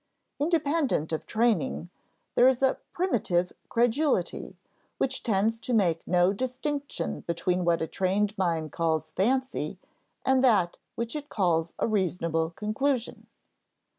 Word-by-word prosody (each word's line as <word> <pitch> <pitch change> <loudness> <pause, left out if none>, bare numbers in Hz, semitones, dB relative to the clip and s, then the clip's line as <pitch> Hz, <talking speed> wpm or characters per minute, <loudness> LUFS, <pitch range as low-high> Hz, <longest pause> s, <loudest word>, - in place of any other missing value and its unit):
Independent 295 - +1
of 160 - -3
training, 210 - 0 0.4
there 245 - +6
is 260 0 +2
a 265 - +3
"primitive 195 - 0 0.2
credulity" 245 +6 0 0.4
which 265 0 -1
tends 220 +1 +1
to 240 +1 -1
make 170 -6 +1
no 180 +1 +3
distinction 265 +5 -3
between 180 +2 -1
what 170 -1 +2
a - - -2
trained 195 +4 0
mind 165 -5 -1
calls 160 -1 -1
fancy 260 +7 0 0.5
and 265 0 +3
that 200 -9 +3 0.2
which 235 +4 -3
it 295 -1 -5
calls 170 -4 +1
a - - +1
reasonable 170 -6 0
conclusion. 225 +7 -2
210 Hz, 125 wpm, -28 LUFS, 175-260 Hz, 0.5 s, there